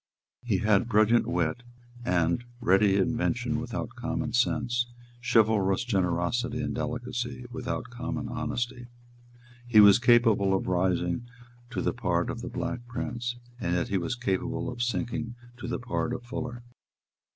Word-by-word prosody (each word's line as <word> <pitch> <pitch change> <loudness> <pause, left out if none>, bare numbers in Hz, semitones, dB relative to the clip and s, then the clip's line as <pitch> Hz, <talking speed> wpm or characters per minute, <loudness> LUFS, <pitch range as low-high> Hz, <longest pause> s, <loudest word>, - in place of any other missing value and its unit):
He 115 -5 +1
had 105 +4 +2
brilliant 110 +1 +4
wit 85 +4 0 0.4
and 85 +2 +1 0.2
ready 100 -3 +4
invention 120 +2 0
without 120 -1 -4
common 120 -1 -3
sense, 120 0 +1
and 120 0 -23
chivalrous 110 -2 +4
generosity 100 +3 0
and - - -2
delicacy 120 0 -3
without 125 -1 -4
common 125 0 -4
honesty. 120 0 -3 0.8
He 115 -3 +6
was 100 0 +9
capable 115 -5 +4
of - - -1
rising 90 +4 0 0.4
to - - -3
the - - +1
part - - 0
of - - -6
the - - -5
Black 120 0 -4
Prince; 120 -1 -3 0.2
and 85 -6 0
yet 85 - 0
he 100 - +1
was 85 +8 -2
capable 100 -6 -1
of 120 -1 -6
sinking 120 -1 -2 0.2
to 120 - -6
the 120 - -1
part 120 0 -2
of 120 - -7
Fuller. 120 -1 -5
120 Hz, 145 wpm, -28 LUFS, 100-120 Hz, 0.8 s, was